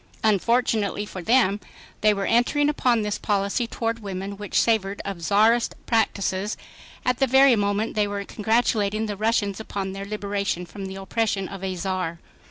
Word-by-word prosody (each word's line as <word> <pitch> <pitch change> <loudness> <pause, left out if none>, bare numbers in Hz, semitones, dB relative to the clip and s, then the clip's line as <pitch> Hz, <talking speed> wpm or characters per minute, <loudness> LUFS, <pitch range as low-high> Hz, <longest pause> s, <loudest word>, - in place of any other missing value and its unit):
Unfortunately 215 -1 +1
for 190 -2 -7
them 210 -1 +3 0.4
they 215 - +5
were 200 -1 -1
entering 285 +5 +2
upon 245 -6 +2
this 210 0 -2
policy 200 +3 0
toward 230 0 -2
women 195 -1 -5
which 205 0 -1
savored 200 -3 +1
of 195 -4 -5
czarist 220 +6 +3
practices, 205 -3 0 0.5
at 250 -1 +1
the 270 - +3
very 265 0 +6
moment 205 +1 0
they 210 -2 +1
were 200 0 -4
congratulating 220 -1 +1
the 210 -2 -3
Russians 205 -1 0
upon 200 -3 -4
their 195 +1 -6
liberation 200 -3 -2
from 195 +3 -8
the 190 - -7
oppression 195 0 -1
of 195 -1 -8
a 190 -1 -2
Czar. 180 -2 -3
205 Hz, 165 wpm, -24 LUFS, 195-225 Hz, 0.5 s, very